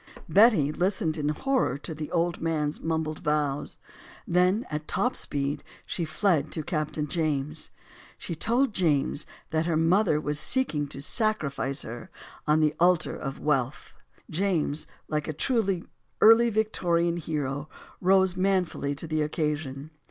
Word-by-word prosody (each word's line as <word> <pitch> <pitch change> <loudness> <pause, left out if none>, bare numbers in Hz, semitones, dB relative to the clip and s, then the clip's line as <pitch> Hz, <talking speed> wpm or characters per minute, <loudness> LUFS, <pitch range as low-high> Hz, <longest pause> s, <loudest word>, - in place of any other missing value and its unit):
Betty 185 - +5
listened 175 -1 0
in 150 -2 -1
horror 260 - 0
to 155 +3 -7
the 155 0 -6
old 170 0 0
man's 155 -2 -1
mumbled 160 -1 -2
vows. 150 -2 -1 0.5
Then, 180 +6 +2
at 150 0 -4
top 250 +1 0
speed, 140 0 -2 0.2
she 170 - -3
fled 155 -2 +1
to 160 - -1
Captain 155 -1 -2
James. 155 -1 -1 0.5
She - - -5
told 235 - +1
James 150 -7 +1 0.2
that 160 +1 0
her 165 -2 +1
mother 165 0 +3
was 150 -1 -2
seeking 160 - 0
to 140 -1 -6
sacrifice 150 - 0
her 120 +1 -8 0.4
on 155 +1 +4
the 155 -1 +3
altar 175 -1 +3
of 135 -2 -5
wealth. 135 -2 -1 0.3
James, 165 -4 +2 0.2
like 150 -1 -2
a 155 - -2
true 195 - 0 0.4
early 225 +2 +7
Victorian 175 -6 +1
hero, 150 -2 -3 0.3
rose 190 0 +4
manfully 185 -6 0
to 150 - -6
the 155 -1 -1
occasion. 150 -2 -2
155 Hz, 140 wpm, -27 LUFS, 150-185 Hz, 0.5 s, early